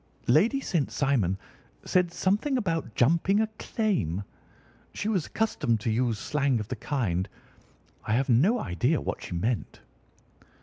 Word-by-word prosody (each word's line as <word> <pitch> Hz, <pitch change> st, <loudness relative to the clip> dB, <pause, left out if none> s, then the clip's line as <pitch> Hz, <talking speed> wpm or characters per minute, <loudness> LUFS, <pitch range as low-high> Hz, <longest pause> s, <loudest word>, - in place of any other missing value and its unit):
"Lady 205 Hz, -, +4 dB
St. 170 Hz, -, -1 dB
Simon 120 Hz, -10 st, +1 dB, 0.5 s
said 180 Hz, -2 st, +2 dB
something 210 Hz, +11 st, +1 dB
about 165 Hz, -, -2 dB
'jumping 170 Hz, -, +3 dB
a 220 Hz, -, +3 dB
claim.' 105 Hz, -, -1 dB, 0.7 s
She 205 Hz, -, -3 dB
was 190 Hz, -7 st, 0 dB
accustomed 120 Hz, -, 0 dB
to 115 Hz, -, 0 dB
use 115 Hz, 0 st, +1 dB
slang 140 Hz, +2 st, 0 dB
of 105 Hz, -, -6 dB
the 130 Hz, -, -2 dB
kind. 105 Hz, -8 st, -1 dB, 0.8 s
I 105 Hz, -, +1 dB
have 130 Hz, +4 st, +2 dB
no 155 Hz, -, +4 dB
idea 125 Hz, -, 0 dB
what -, -, -4 dB
she -, -, -6 dB
meant." 110 Hz, +7 st, -2 dB
140 Hz, 140 wpm, -27 LUFS, 115-190 Hz, 0.8 s, Lady